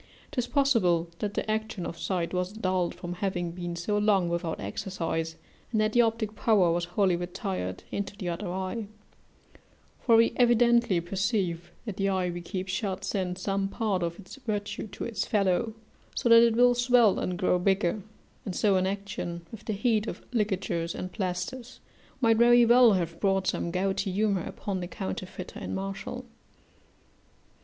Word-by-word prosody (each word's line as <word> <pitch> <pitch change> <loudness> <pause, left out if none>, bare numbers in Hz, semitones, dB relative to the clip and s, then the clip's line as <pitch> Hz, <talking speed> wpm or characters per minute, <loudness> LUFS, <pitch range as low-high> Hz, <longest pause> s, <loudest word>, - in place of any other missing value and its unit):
'Tis 245 -1 -1
possible 190 - +2
that 205 -1 -3
the 215 - -1
action 215 -4 -2
of - - -5
sight 175 0 -2
was 180 +1 -1
dulled 185 -4 -1
from 175 0 -6
having 180 -2 -2
been 175 0 -5
so 205 +5 -1
long 200 -4 +3
without 170 -1 -2
exercise, 165 - -3 0.4
and 220 - +1
that 215 0 +2
the 240 - +6
optic 225 -2 0
power 200 -8 +3
was 170 +1 0
wholly 180 +1 +2
retired 175 - -4
into 200 0 -4
the 185 - -5
other 175 +2 -3
eye: 190 +4 -3 1.1
for 230 - +4
we 230 0 +5
evidently 235 -5 +4
perceive 185 -1 -1
that 215 -5 -5
the 195 0 +1
eye 185 -2 0
we 175 0 -5
keep 185 +2 -4
shut 190 0 -2
sends 185 -2 -2
some 195 0 0
part 200 -2 -1
of 170 0 -2
its 195 +6 -11
virtue 215 -4 -3
to - - -7
its 220 -4 -2
fellow, 205 +1 +1 0.4
so - - 0
that 230 0 +9
it 235 -1 +4
will 245 +1 +6
swell 240 -3 +4
and 180 -1 -2
grow 180 0 +2
bigger; 190 +1 +1 0.4
and 190 - -5
so 200 -3 +3
inaction, 190 -3 -3
with 220 -2 -10
the 215 - -1
heat 215 +1 +1
of - - -6
ligatures 190 -6 -1
and, 185 - -5
plasters, 215 +7 -4 0.4
might 225 -3 +4
very 240 +1 +6
well 240 -1 +7
have 170 -3 -2
brought 195 -1 +1
some 170 - -1
gouty 190 +2 -1
humour 200 -1 +1
upon 195 -2 -4
the 175 - -4
counterfeiter 185 -1 -6
in - - -4
Martial. 195 +6 -5
195 Hz, 170 wpm, -28 LUFS, 180-220 Hz, 1.1 s, that